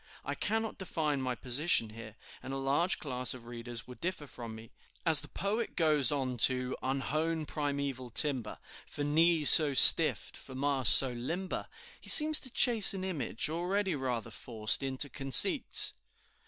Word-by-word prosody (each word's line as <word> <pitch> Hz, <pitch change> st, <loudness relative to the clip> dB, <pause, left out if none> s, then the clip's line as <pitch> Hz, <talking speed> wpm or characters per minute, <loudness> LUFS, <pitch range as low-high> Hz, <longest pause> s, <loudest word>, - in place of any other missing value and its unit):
I -, -, -5 dB
cannot 220 Hz, 0 st, -5 dB
define 155 Hz, -6 st, -4 dB
my 130 Hz, -1 st, -5 dB
position 125 Hz, +1 st, -1 dB
here, 110 Hz, -1 st, -13 dB, 0.3 s
and 135 Hz, -, -9 dB
a -, -, -5 dB
large 140 Hz, +7 st, -2 dB
class 125 Hz, -4 st, -3 dB
of 120 Hz, -2 st, -14 dB
readers 120 Hz, 0 st, -9 dB
would 125 Hz, +4 st, -15 dB
differ 175 Hz, -3 st, -6 dB
from 120 Hz, -5 st, -12 dB
me. 110 Hz, 0 st, -15 dB, 0.3 s
As 160 Hz, -4 st, +2 dB
the 145 Hz, -, -10 dB
poet 210 Hz, +7 st, -6 dB
goes 150 Hz, -7 st, 0 dB
on 130 Hz, -3 st, -5 dB
to 125 Hz, +1 st, -1 dB
"Unhewn 155 Hz, +4 st, -4 dB
primeval 140 Hz, -4 st, -6 dB
timber, 125 Hz, -2 st, -1 dB, 0.3 s
For 145 Hz, -, -8 dB
knees 160 Hz, +1 st, +3 dB
so 150 Hz, -4 st, +5 dB
stiff, 135 Hz, -8 st, +6 dB
for 130 Hz, -, -12 dB
masts 135 Hz, -1 st, +3 dB
so 135 Hz, -2 st, +1 dB
limber." 165 Hz, +11 st, -7 dB, 0.3 s
he -, -, -4 dB
seems 310 Hz, 0 st, +7 dB
to 260 Hz, -, -6 dB
chase 230 Hz, -5 st, +3 dB
an 190 Hz, -, -7 dB
image, 145 Hz, -, -4 dB
already 180 Hz, +4 st, -4 dB
rather 125 Hz, -5 st, -6 dB
forced, 110 Hz, 0 st, -1 dB
into 135 Hz, +1 st, -3 dB
conceits. 135 Hz, -3 st, +4 dB
140 Hz, 160 wpm, -29 LUFS, 125-165 Hz, 0.3 s, seems